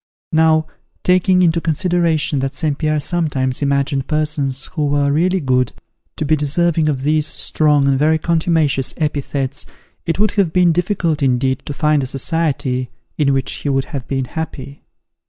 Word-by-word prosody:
Now, 160 -1 +3 0.4
taking 185 0 +3
into 170 -1 +2
consideration 165 -2 0
that 135 +1 -3
St. 150 +1 -1
Pierre 155 0 0
sometimes 145 -6 -1
imagined 140 -1 0
persons 150 -3 0
who 150 -2 0
were 140 0 +1
really 180 +6 +1
good, 125 -4 0 0.4
to 155 - -2
be 155 +2 +3
deserving 155 +2 +1
of 135 -3 -2
these 155 +1 +1
strong 150 -3 +2
and 135 -1 +2
very 155 +2 +3
contumacious 160 -5 0
epithets, 140 -2 -3 0.4
it 165 - 0
would 210 +2 +2
have 195 -6 +1
been 180 0 +4
difficult 170 -2 -1
indeed 130 0 +1
to 145 - -3
find 150 0 +1
a 130 - -3
society 135 -3 -1 0.3
in 140 -2 +3
which 135 -1 -1
he 145 - -4
could 135 -1 0
have 135 -3 -5
been 135 -1 -2
happy. 140 -2 -7
150 Hz, 160 wpm, -18 LUFS, 135-160 Hz, 0.4 s, been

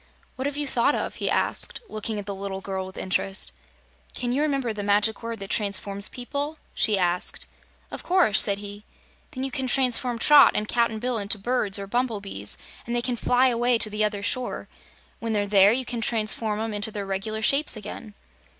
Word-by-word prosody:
"What 260 +2 -2
have 285 0 -4
you 295 - -1
thought 260 +2 +2
of?" - - -4
he - - -1
asked, - - +4
looking 215 - -4
at 205 - -5
the 200 - -4
little 195 0 -5
girl 190 -1 -4
with 190 - -12
interest. 190 +1 -2 0.6
"Can 245 -1 -2
you 275 - +1
remember 275 -6 0
the 210 - -5
Magic 205 +1 +1
Word 230 0 -5
that 195 0 -7
transforms 200 -1 -1
people?" 285 +5 -5 0.2
she 215 -3 +2
asked. 180 -1 +1 0.5
"Of - - -6
course," 350 - +3
said 200 -1 0
he. 205 0 -8 0.5
"Then 260 -3 -6
you 270 - -2
can 265 -2 -2
transform 250 -2 +1
Trot 290 +4 +7
and 210 - -1
Cap'n 235 -1 +1
Bill 245 +1 -2
into 205 +1 +2
birds 210 -2 0
or 200 - -5
bumblebees, 215 -2 -2 0.3
and 235 - -2
they 240 - 0
can 250 -1 -1
fly 250 +2 +3
away 240 0 +2
to 215 -1 +2
the 210 +1 0
other 205 -1 -1
shore. 255 +4 -2 0.5
When 230 -1 -3
they're 205 -1 +1
there, 200 0 +6
you 255 +3 0
can 240 -1 -4
transform 215 -1 0
'em 225 0 -3
into 205 +2 +1
their 205 -2 -5
reg'lar 210 +3 -3
shapes 275 0 +3
again!" 210 0 -9
220 Hz, 200 wpm, -25 LUFS, 205-250 Hz, 0.6 s, Trot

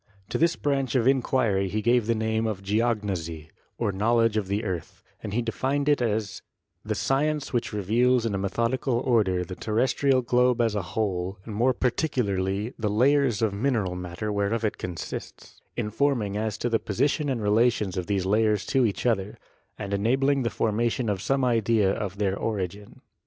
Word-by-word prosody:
To - - -2
this 165 +1 +3
branch 135 -4 -1
of 125 -1 +3
inquiry 120 -7 +2
he 110 +3 -2
gave 120 -1 +3
the 115 - +2
name 110 0 0
of 100 -3 -4
geognosy, 100 -7 -1 0.3
or 115 -4 0
knowledge 115 +3 +2
of 105 -3 0
the 100 +3 -1
earth, 90 -5 -5 0.2
and 105 - -5
he 120 +3 0
defined 135 +5 -1
it 145 -3 +3
as 110 -3 -1 0.4
the - - -2
science 145 +1 0
which 120 - -1
reveals 115 +4 +2
in 110 - -1
a - - 0
methodical 115 +6 0
order 110 -8 +1
the 90 - -7
terrestrial 130 +5 +1
globe 125 0 +2
as 115 -2 +2
a 105 - -1
whole 95 -1 -2
and 110 - -7
more 120 +5 +3
particularly 115 -5 -1
the 110 -2 0
layers 125 0 +3
of 110 -3 +1
mineral 105 -4 0
matter 90 +4 -4
whereof 105 +2 0
it 105 - -2
consists, 85 -4 -7 0.2
informing 110 -2 0
as 105 0 -2
to 120 - -2
the 115 -2 +1
position 140 +7 0
and 120 -5 -2
relations 105 -2 +2
of 90 -2 -3
these 100 -3 0
layers 105 +1 +2
to 130 -3 +2
each 100 - -4
other, 105 -4 0 0.4
and 100 -1 -5
enabling 135 +7 +2
the 115 - 0
formation 115 +2 0
of 100 -3 -1
some 135 +2 +1
idea 115 -4 +2
of 100 -2 -4
their 100 -2 0
origin. 100 -1 -4
110 Hz, 180 wpm, -26 LUFS, 100-125 Hz, 0.4 s, this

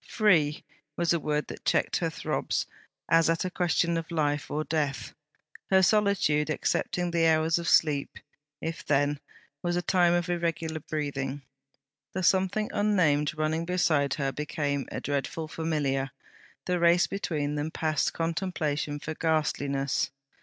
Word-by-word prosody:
'Free,' 165 -9 +2 0.3
was 170 0 +2
a 170 - +1
word 150 0 -1
that - - -9
checked - - +1
her - - 0
throbs, - - -2 0.4
as 165 0 +4
at 165 +2 +1
a 185 - -2
question 170 -1 +1
of 165 -1 -4
life 150 -3 -1
or 155 +1 -1
death. 150 -4 -2 0.6
Her 190 -1 +5
solitude, 190 -7 +3
excepting 175 +3 -1
the 165 -1 +3
hours 160 +1 +3
of 170 - -2
sleep, 145 -3 +2 0.4
if 165 0 -4
then, 145 0 +1 0.4
was 175 0 -1
a 175 - +1
time 175 -2 +3
of 175 0 0
irregular 165 -2 -2
breathing. 140 -2 -4 0.7
The 185 - -2
something 190 +4 +2
unnamed, 160 -8 +2
running 155 +1 0
beside 160 -6 +1
her, 135 -2 -1
became 145 -2 -2
a - - -3
dreadful 145 +3 -3
familiar; 145 -4 -1 0.6
the 180 -1 0
race 170 +1 +5
between 150 -7 -2
them 150 +1 -2
past 155 -2 0
contemplation 165 -4 -2
for 155 +2 -5
ghastliness. 145 -4 0
160 Hz, 145 wpm, -28 LUFS, 145-175 Hz, 0.7 s, Her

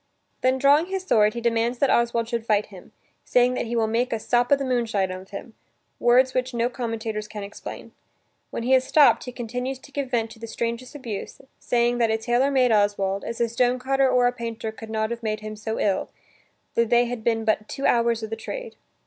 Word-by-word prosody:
Then 255 +1 +2
drawing 285 +5 +4
his 380 0 -3
sword, 215 - +3
he 235 - -3
demands 235 +1 +1
that 275 +2 +2
Oswald 235 -1 +2
should 235 -1 -2
fight 210 -2 +2
with - - -19
him, 185 -3 -13 0.3
saying 250 0 +3
that 250 - -2
he 235 - -3
will 225 -1 +2
make 230 +3 0
a 225 - -1
"sop 240 +3 +1
o' - - +8
the 275 0 -3
moonshine" 225 -7 0
of 185 +1 -8
him, 220 +3 -8 0.5
words 255 +2 +4
which 255 0 -1
no 235 +1 +1
commentators 225 -4 -4
can 210 -1 -7
explain. 200 - -9 0.6
When - - -4
he 255 +2 +2
is 260 -1 +5
stopped, 290 +2 +4
he 250 - -6
continues 250 +2 -4
to 270 - -17
give 280 -1 -3
vent 225 -3 -1
to - - -13
the 230 - -7
strangest 235 +4 -4
abuse, 235 -8 -6 0.2
saying 240 0 +1
that 230 -1 +3
a 220 - +2
tailor 240 +4 +1
made 255 -3 +3
Oswald, 205 -2 +1
as 230 +1 -5
"a 235 - +2
stone 245 +2 +1
cutter 270 +1 +2
or 250 -1 +3
a 245 - +4
painter 230 -2 -5
could 220 +1 -11
not 220 0 -1
have 235 0 -4
made 215 -1 -2
him 215 0 -6
so 220 +1 -4
ill, 195 -2 0 0.6
tho 235 - +3
they 240 +1 +3
had 240 -2 -5
been 225 -1 0
but 215 0 0
two 275 - -4
hours 235 -1 +2
o' - - 0
the 220 +1 -4
trade!" 470 - -7
235 Hz, 230 wpm, -24 LUFS, 220-250 Hz, 0.6 s, o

